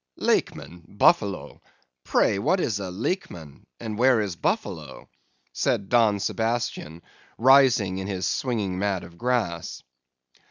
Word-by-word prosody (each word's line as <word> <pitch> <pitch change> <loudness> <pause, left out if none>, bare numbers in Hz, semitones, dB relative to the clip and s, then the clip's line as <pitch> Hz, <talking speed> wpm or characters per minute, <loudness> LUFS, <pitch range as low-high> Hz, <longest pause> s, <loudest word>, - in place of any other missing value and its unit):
"'Lakeman!—Buffalo! 95 +3 0 0.4
Pray, 100 - +1
what 185 - +1
is 110 - -1
a 95 -2 -5
Lakeman, 90 - -5
and 110 -2 -6
where 125 -1 +4
is 100 -4 -2
Buffalo?' - - -4 0.5
said 100 -1 -1
Don 110 -4 +3
Sebastian, 110 -7 -3 0.3
rising 120 -7 +4
in 95 - -5
his 95 -3 -3
swinging 105 -7 -2
mat 100 -2 -1
of 85 0 -13
grass. 120 -10 -2
100 Hz, 115 wpm, -25 LUFS, 95-120 Hz, 0.5 s, where